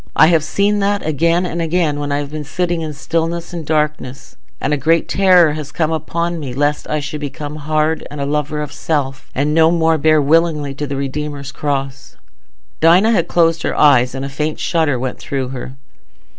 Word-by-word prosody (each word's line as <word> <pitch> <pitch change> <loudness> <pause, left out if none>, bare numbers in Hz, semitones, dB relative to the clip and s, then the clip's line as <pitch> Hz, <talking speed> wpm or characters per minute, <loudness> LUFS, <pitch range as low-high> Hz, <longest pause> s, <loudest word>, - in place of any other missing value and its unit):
I 155 - +6
have 165 -3 +3
seen 200 +6 +1
that 200 0 0
again 165 +4 +1
and 170 -1 -3
again 165 -3 0
when 145 0 -3
I 140 - +1
have 145 0 -4
been 155 0 -5
sitting 175 +3 -2
in 155 -1 -4
stillness 165 +3 -3
and 170 -2 -5
darkness, 150 -3 -2 0.2
and 150 - -1
a - - +4
great 160 +4 +1
terror 180 -5 +4
has 150 -1 -6
come 160 0 -1
upon 170 +1 -2
me 130 -5 -6
lest 145 +2 0
I 155 - 0
should 145 +1 -5
become 145 +1 -6
hard, 155 +1 -1
and 150 - -8
a 140 - -1
lover 150 +1 -2
of 150 - -7
self, 140 -3 -3
and 145 +3 0
no 160 0 +5
more 165 -1 +2
bear 155 +1 +4
willingly 150 -1 +2
the 140 0 -4
Redeemer's 140 +1 -4
cross." 135 -2 -4 0.6
Dinah 180 +7 +5
had 185 -7 +1
closed 165 -1 +2
her - - -2
eyes, 125 -4 +4
and 135 +1 -4
a - - -5
faint 150 +3 -3
shudder 160 -6 +1
went 125 0 -4
through 135 -2 -3
her. 130 0 -7
150 Hz, 200 wpm, -17 LUFS, 145-165 Hz, 0.6 s, I